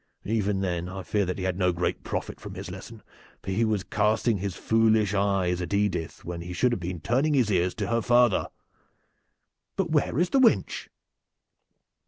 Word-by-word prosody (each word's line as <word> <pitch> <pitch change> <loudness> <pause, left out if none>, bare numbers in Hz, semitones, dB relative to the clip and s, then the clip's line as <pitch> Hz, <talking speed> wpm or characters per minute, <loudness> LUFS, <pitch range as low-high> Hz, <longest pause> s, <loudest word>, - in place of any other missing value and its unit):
Even 105 -2 0
then 90 -2 -2
I 95 0 -6
fear 100 -1 0
that 90 - -2
he 95 - -4
had 95 0 -1
no 90 -1 +3
great 90 0 -2
profit - - -4
from - - -8
his - - -7
lesson, - - -10 0.4
for - - -4
he 105 +5 +1
was 110 -4 0
casting 105 0 +1
his 95 -1 -3
foolish 110 -2 +2
eyes 95 -3 +1
at 90 +3 -2
Edith 95 -5 -1
when 85 0 -5
he 90 +1 -6
should 125 +8 +2
have 120 - -1
been 90 0 -4
turning 135 - +1
his 120 -6 +2
ears 90 -1 +1
to 105 - -2
her 115 +3 0
father. 120 -2 +3 1.3
But 185 -4 -1
where 150 -3 +1
is 175 +2 +1
the 275 - +4
wench?" 245 -4 +2
100 Hz, 190 wpm, -26 LUFS, 90-115 Hz, 1.3 s, the